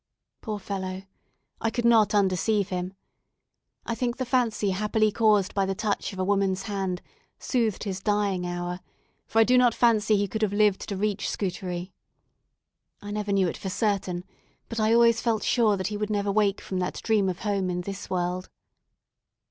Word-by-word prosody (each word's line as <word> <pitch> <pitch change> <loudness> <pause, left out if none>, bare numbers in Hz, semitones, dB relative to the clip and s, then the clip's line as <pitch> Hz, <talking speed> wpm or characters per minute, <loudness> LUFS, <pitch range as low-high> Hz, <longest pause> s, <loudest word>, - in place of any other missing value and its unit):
Poor 215 -2 -4
fellow! 190 -1 -5 0.6
I 225 - +1
could 235 +1 -2
not 220 -2 +5
undeceive 200 +1 +2
him. 185 +1 -4 0.9
I 230 - -2
think 240 +1 -2
the 260 - -2
fancy 235 -5 +1
happily 215 +2 +1
caused 210 -3 +3
by 195 -1 +1
the 195 - -1
touch 210 0 -2
of 190 - -10
a 185 - 0
woman's 195 -1 +1
hand 195 -4 -3 0.3
soothed 230 -6 -1
his 190 -3 -3
dying 200 -3 0
hour; 175 0 -4 0.5
for - - -3
I 225 - +8
do 250 +2 +4
not 245 -2 +4
fancy 220 -3 +3
he 200 0 0
could 220 +3 -4
have 210 -2 +1
lived 205 -2 +3
to 200 - -3
reach 210 +1 -1
Scutari. 180 -1 -4 1.1
I 205 - -8
never 210 -1 -2
knew 195 -2 +3
it - - -4
for 190 - -5
certain, 190 -3 -1 0.5
but 230 - -4
I 215 0 +3
always 230 0 +5
felt 225 -3 0
sure 220 -5 +3
that 185 - -3
he 210 - -3
would 210 0 -2
never 205 -1 0
wake 205 -1 +1
from 185 - -4
that 180 - -2
dream 210 -4 +2
of 180 0 -5
home 200 -3 0
in 180 0 -2
this 195 +2 -7
world. 180 0 -2
205 Hz, 185 wpm, -26 LUFS, 190-220 Hz, 1.1 s, I